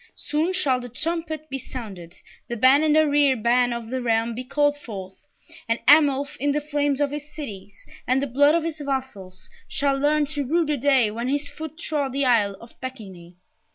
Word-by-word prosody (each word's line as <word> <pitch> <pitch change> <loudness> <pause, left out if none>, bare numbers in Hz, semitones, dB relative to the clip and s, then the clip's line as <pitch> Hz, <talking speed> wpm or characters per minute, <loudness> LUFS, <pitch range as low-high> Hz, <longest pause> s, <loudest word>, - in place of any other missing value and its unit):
Soon 305 +4 -1
shall 285 -9 +2
the 245 0 -8
trumpet 315 +3 -2
be 270 -2 -4
sounded, 200 -10 -9 0.3
the 240 - -4
ban 260 +5 +5
and 310 -1 +3
arriere 290 -3 +4
ban 245 +2 +2
of 235 -1 -5
the 260 0 -2
realm 230 -1 0
be 250 +3 -5
called 290 +3 +1
forth, 200 -3 -10 0.4
and 230 - +2
Arnulf, 285 -1 +5
in 285 +1 0
the 300 - +1
flames 290 -2 -1
of 290 -1 +1
his 295 +1 -7
cities, 205 -9 -9 0.2
and 255 +2 +3
the 280 - -1
blood 285 +4 +4
of 335 - +1
his 320 -1 -4
vassals, 260 -10 -5 0.2
shall 280 -1 0
learn 295 +2 +2
to 290 0 -3
rue 325 +5 +1
the 300 0 0
day 265 -5 +3
when 235 +3 -4
his 285 +2 -1
foot 315 -1 -8
trod 290 -5 -2
the 275 0 +1
Isle 210 -6 +2
of 235 - -14
Pecquigny! 190 -10 -9
275 Hz, 195 wpm, -23 LUFS, 235-295 Hz, 0.4 s, ban